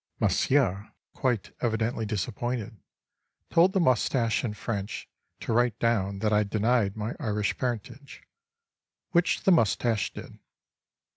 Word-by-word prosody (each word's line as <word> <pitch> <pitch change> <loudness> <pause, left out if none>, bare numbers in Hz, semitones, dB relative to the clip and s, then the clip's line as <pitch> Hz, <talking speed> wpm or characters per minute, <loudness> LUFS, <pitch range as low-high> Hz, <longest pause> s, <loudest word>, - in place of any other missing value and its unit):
Monsieur, 110 -8 +1 0.2
quite 125 -7 -1
evidently 110 -1 -1
disappointed, 110 +3 -3 0.8
told 175 +3 +5
the 195 - +2
moustache 125 - +2
in 110 -4 -3
French 105 -2 -4 0.3
to - - -3
write 120 -1 +2
down 100 -5 0
that 105 +1 0
I 105 0 +4
denied 110 0 +1
my 110 +2 -3
Irish 105 -6 -1
parentage; 125 +3 -5 0.9
which 175 +1 +2
the 190 - +4
moustache 115 - +2
did. - - -10
115 Hz, 120 wpm, -27 LUFS, 105-125 Hz, 0.9 s, told